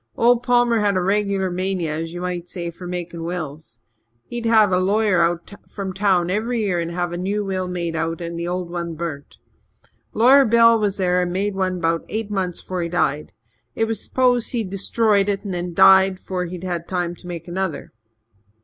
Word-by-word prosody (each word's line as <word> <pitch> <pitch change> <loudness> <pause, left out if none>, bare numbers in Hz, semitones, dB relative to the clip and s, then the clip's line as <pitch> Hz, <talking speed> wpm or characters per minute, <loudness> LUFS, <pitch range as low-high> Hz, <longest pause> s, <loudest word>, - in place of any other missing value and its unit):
Old 240 0 +4
Palmer 245 -2 +3
had 205 -2 +1
a - - +3
regular 195 0 0
mania, 180 -3 -2
as 165 0 -4
ye 175 - -6
might 180 -1 -4
say, 170 -2 -5
for 175 +1 -10
makin' 175 -2 -5
wills. 155 -8 -6 0.4
He'd 240 -1 -4
have 220 -3 +5
a 180 - +3
lawyer 200 -1 +2
out 170 +3 -1 0.2
from 195 -2 -5
town 185 -3 +2
every 225 +3 -1
year 185 -4 0
and 170 0 -2
have 175 0 -2
a 175 - -4
new 200 +3 -1
will 185 -1 -2
made 170 -2 -3
and 165 +1 -3
the 170 - -3
old 180 -1 -3
one 170 -1 -4
burnt. 155 -3 -6 0.7
Lawyer 260 +5 +6
Bell 230 -1 +5
was 205 -2 0
there 180 -2 +2
and 180 -1 -1
made 200 +3 -1
one 185 -1 -1
'bout 165 -1 0
eight 220 -1 -4
months 185 -3 -2
'fore 185 -1 -4
he 170 - -2
died. 150 -4 -1 0.4
It 225 - +1
was 225 0 -3
s'posed 250 -2 +1
he'd 220 -6 -2
destroyed 200 +1 +1
it 200 0 -1
and 200 -3 -4
then 175 -1 -4
died 190 0 +6
'fore 185 -2 -3
he'd 180 +1 -7 0.2
time 175 -2 -2
to 175 - -13
make 170 0 -7
another. 180 -3 -4
185 Hz, 195 wpm, -21 LUFS, 175-205 Hz, 0.7 s, Lawyer